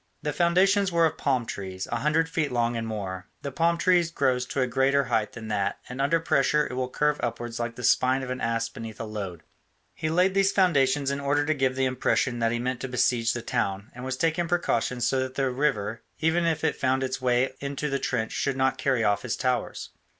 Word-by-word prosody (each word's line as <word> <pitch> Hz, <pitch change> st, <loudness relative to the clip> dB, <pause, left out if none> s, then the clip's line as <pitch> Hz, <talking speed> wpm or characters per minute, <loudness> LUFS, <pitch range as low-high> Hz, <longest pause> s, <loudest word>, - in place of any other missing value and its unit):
The 150 Hz, -, -1 dB
foundations 185 Hz, +4 st, +3 dB
were 170 Hz, -1 st, +4 dB
of 160 Hz, -, -1 dB
palm 130 Hz, -4 st, +1 dB
trees, 95 Hz, -3 st, -5 dB
a 120 Hz, -, 0 dB
hundred 150 Hz, +6 st, +1 dB
feet 165 Hz, -4 st, -1 dB
long 120 Hz, -1 st, 0 dB
and 115 Hz, -1 st, -3 dB
more 95 Hz, -4 st, -5 dB, 0.2 s
the 140 Hz, -, -4 dB
palm 170 Hz, +4 st, +1 dB
tree 180 Hz, 0 st, +4 dB
grows 130 Hz, -6 st, 0 dB
to 135 Hz, -, -1 dB
a -, -, +3 dB
greater 135 Hz, +3 st, +2 dB
height 115 Hz, -4 st, -1 dB
than 110 Hz, -2 st, -8 dB
that, 100 Hz, -2 st, -1 dB
and 125 Hz, +2 st, -5 dB
under 145 Hz, +4 st, +2 dB
pressure 150 Hz, -1 st, +2 dB
it -, -, -6 dB
will 125 Hz, 0 st, -2 dB
curve 150 Hz, +2 st, +1 dB
upwards 120 Hz, 0 st, -3 dB
like 120 Hz, 0 st, -3 dB
the 125 Hz, -, -8 dB
spine 130 Hz, +3 st, +3 dB
of 130 Hz, -, -4 dB
an 130 Hz, -, -4 dB
ass 115 Hz, 0 st, 0 dB
beneath 115 Hz, -1 st, -9 dB
a -, -, -3 dB
load. 100 Hz, -6 st, -6 dB, 0.5 s
He 155 Hz, -, -3 dB
laid 180 Hz, +4 st, +3 dB
these 195 Hz, 0 st, +3 dB
foundations 140 Hz, -7 st, +2 dB
in 140 Hz, -, -2 dB
order 145 Hz, +1 st, +1 dB
to 155 Hz, -, +2 dB
give 130 Hz, -3 st, 0 dB
the 135 Hz, 0 st, +1 dB
impression 125 Hz, -1 st, 0 dB
that 115 Hz, -1 st, +1 dB
he 120 Hz, -, 0 dB
meant 125 Hz, +1 st, -2 dB
to -, -, -3 dB
besiege 120 Hz, -2 st, +1 dB
the 120 Hz, -, -5 dB
town, 100 Hz, -4 st, -2 dB
and 125 Hz, -, -9 dB
was 130 Hz, 0 st, -3 dB
taking 165 Hz, +2 st, +1 dB
precautions 125 Hz, -8 st, 0 dB
so 135 Hz, -, +1 dB
that 130 Hz, 0 st, -3 dB
the 135 Hz, -2 st, 0 dB
river, 120 Hz, -5 st, -1 dB, 0.2 s
even 165 Hz, +2 st, +2 dB
if 160 Hz, -2 st, 0 dB
it -, -, +1 dB
found 130 Hz, 0 st, 0 dB
its 130 Hz, 0 st, -3 dB
way 125 Hz, +1 st, +2 dB
into 140 Hz, +1 st, -3 dB
his 140 Hz, -, 0 dB
trench, 110 Hz, -5 st, -1 dB
should 135 Hz, -1 st, -1 dB
not 130 Hz, 0 st, +1 dB
carry 130 Hz, -4 st, +1 dB
off 105 Hz, -1 st, +2 dB
his 130 Hz, -, -2 dB
towers. 125 Hz, -1 st, -2 dB
130 Hz, 230 wpm, -26 LUFS, 120-150 Hz, 0.5 s, were